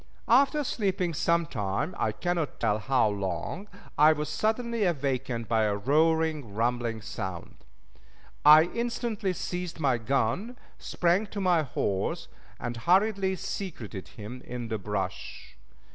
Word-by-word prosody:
After 280 +5 +4
sleeping 190 -8 -1
some 170 +2 +2
time 115 - -2
I 110 - 0
cannot 165 +7 -2
tell 105 -2 +1
how 125 0 +2
long 100 - -3 0.3
I 155 +1 +7
was 150 0 -4
suddenly 230 +1 0
awakened 135 - -1
by 110 -1 +2
a 105 -1 +1
roaring, 155 0 +1
rumbling 115 -1 -1
sound. 95 -4 -6 0.9
I 150 +1 +9
instantly 230 -1 -2
seized 175 -1 -4
my 135 -6 +2
gun, 135 - -1 0.2
sprang 180 +5 +1
to 200 - -6
my 180 -4 +3
horse, 100 -8 -2 0.3
and 120 -1 -4
hurriedly 190 - +2
secreted 125 - -6
him 115 +4 -9
in 120 -2 -6
the 110 -1 -2
brush. 95 - -5
150 Hz, 130 wpm, -28 LUFS, 115-185 Hz, 0.9 s, I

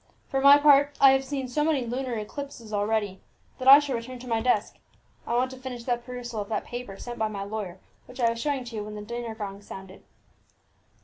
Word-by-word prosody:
"For 270 -1 0
my 280 +1 +9
part, 285 -1 +5
I 270 -1 +8
have 270 0 +2
seen 270 -1 -4
so 295 +4 0
many 300 -5 +1
lunar 250 +1 -3
eclipses 230 0 -7
already, 205 -2 -1 0.4
that 255 - -3
I 275 +1 +12
shall 290 -3 -1
return 245 +2 -6
to 250 +1 -11
my 225 -2 0
desk. 220 -3 0 0.5
I 235 - 0
want 255 +2 +1
to 260 - -9
finish 255 -2 -7
the 245 0 +1
perusal 240 -2 -6
of 200 - -7
that 215 - -2
paper 240 -5 -7
sent 240 +2 -7
by 220 - +1
my 200 -2 -5
lawyer 200 -3 -5 0.3
which 250 - -13
I 230 -2 +3
was 230 - -5
showing 280 -2 -1
to 235 -1 -9
you 210 - -3
when 210 0 -8
the 210 - -6
dinner 235 +1 -5
gong 200 -2 -6
sounded." 190 -1 -11
240 Hz, 230 wpm, -26 LUFS, 215-265 Hz, 0.5 s, I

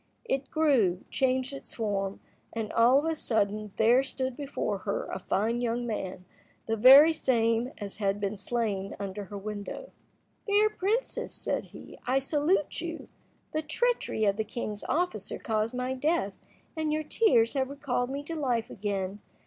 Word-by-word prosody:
It 270 - -1
grew, 245 - +2
changed 260 +1 +1
its 275 - -8
form, 200 -3 -2 0.3
and, 225 -2 -3
all 240 +3 +6
of 290 - +1
a 325 - +1
sudden, 215 -7 -1
there 235 +4 +5
stood 260 -1 -3
before 285 0 -3
her - - -2
a - - -3
fine 225 +5 0
young 240 0 -1
man, 190 -5 -4 0.4
the 225 - 0
very 275 +8 +9
same 235 -3 +1
as 200 -2 -7
had 200 -1 0
been 200 +1 -2
slain 200 -2 -2
under 200 0 -5
her 200 +2 -7
window. 210 - -6 0.6
"Fair 420 +1 +4
princess," 425 +5 -1
said - - -2
he, - - -12
"I 260 +2 +3
salute 295 +4 +1
you. 330 -1 -6 0.4
The 310 - 0
treachery 320 - 0
of 200 0 +2
the 220 - 0
king's 215 -1 -5
officer 310 - -1
caused 220 +2 -1
my 250 +1 -1
death, 260 - 0 0.4
and 315 -1 -1
your 310 +1 0
tears 240 - +3
have 265 -2 0
recalled 270 -3 -2
me 280 +2 -4
to 330 +3 -5
life 245 -7 -1
again. 200 -1 -3
240 Hz, 165 wpm, -29 LUFS, 210-290 Hz, 0.6 s, very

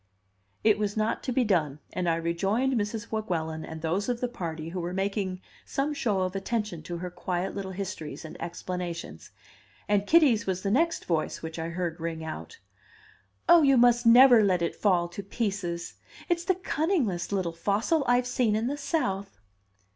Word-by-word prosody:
'" 100 +1 -42
It 210 - 0
was 210 0 -1
not 215 +1 0
to 255 - -3
be 250 +1 +2
done, 160 - +1 0.2
and 180 -1 0
I 165 - +3
rejoined 195 +10 0
Mrs. 220 0 -2
Weguelin 160 -7 -2
and 160 0 -8
those 185 +8 0
of 245 -1 -1
the 250 - 0
party 165 -8 -5
who 180 +2 -4
were 175 +1 -3
making 195 -1 -2 0.2
some 285 +2 -1
show 215 -9 0
of 185 +1 -2
attention 210 -3 -2
to 170 +2 -5
her 180 +1 -5
quiet 180 +1 -3
little 195 -1 -4
histories 185 -5 -6
and 160 - -9
explanations; 175 0 -5 0.6
and 205 0 +1
Kitty's 275 -10 +5
was 185 -1 -1
the 200 - 0
next 330 +8 +1
voice 165 -2 -1
which 160 0 -5
I 165 +1 -3
heard 170 -1 -3
ring 165 -1 -4
out 160 - -7 0.9
"Oh, 345 -1 +8
you 275 -3 +5
must 240 0 +5
never 240 -1 +8
let 185 -4 +2
it 170 - -1
fall 180 -4 +2
to 175 - -6
pieces! 195 -5 -3 0.4
It's 345 0 0
the 375 - +2
cunningest 305 - -1
little 185 -4 -1
fossil 210 - +1
I've 245 +1 +3
seen 245 -3 +1
in 220 +2 0
the 280 +4 -2
South." 200 - -2
195 Hz, 185 wpm, -28 LUFS, 170-240 Hz, 0.9 s, Oh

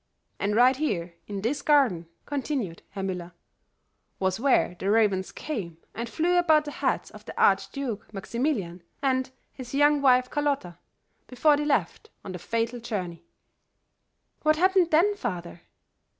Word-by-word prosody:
And 205 +1 0
right 250 +3 +6
here, 180 - -2
in 200 -2 -4
this 265 +6 -1
garden," 255 - +3 0.2
continued 265 - -3
Herr 195 -1 -6
Müller, 180 -2 -4 0.8
"was 190 +1 0
where 255 -8 +2
the 195 - -1
ravens 205 -3 +2
came 195 - -5 0.2
and 235 +1 -5
flew 350 +6 +2
about 315 -3 +4
the 295 - -5
heads - - -1
of - - -13
the - - -8
Archduke 250 -9 +1
Maximilian 205 - -2 0.2
and 260 -1 +1 0.2
his 255 0 -8
young 290 0 +4
wife 255 -2 +5
Carlota 280 - -1 0.5
before 295 +4 +3
they 295 +1 -2
left 300 +8 -1 0.2
on 195 - -5
that 180 - -6
fatal 230 +5 -2
journey." 180 -7 -5 1.1
"What 310 0 +3
happened 370 +1 +3
then, 345 +7 +4
father?" 175 - -5
245 Hz, 145 wpm, -26 LUFS, 190-290 Hz, 1.1 s, right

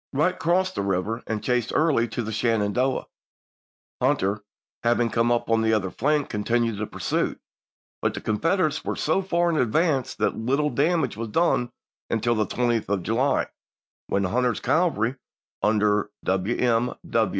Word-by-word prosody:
Wright 155 +7 +1
crossed 185 +3 +1
the - - -2
river 100 +4 -1
and 110 -2 -3
chased 125 -2 0
Early 145 -7 +3
to 115 +2 -4
the 110 - -4
Shenandoah; 115 +3 0 1.0
Hunter, 110 -6 +1 0.4
having 120 -1 +2
come 115 +1 +2
up 120 0 +1
on 115 -1 +2
the 110 0 +2
other 95 -4 0
flank, 150 +2 +1
continued 115 +1 0
the 110 - -2
pursuit, - - -2 0.6
but - - 0
the - - -3
Con 105 -1 -1
federates 165 -3 +1
were - - -2
so 160 +5 +1
far 175 -2 +1
in 160 - 0
advance 135 +2 +1
that - - 0
little 140 +6 0
damage 145 - +1
was 115 +1 -3
done 125 -1 +1 0.4
until 115 +1 +1
the 110 -3 0
20th 120 -2 0
of 100 -3 0
July, 125 +7 +1 0.6
when 100 - 0
Hunter's 120 +5 +1
186* - - -29
cavalry, 140 - +1 0.5
under 105 -1 +2 0.2
Wm. 115 +5 +1
120 Hz, 160 wpm, -25 LUFS, 110-145 Hz, 1.0 s, Early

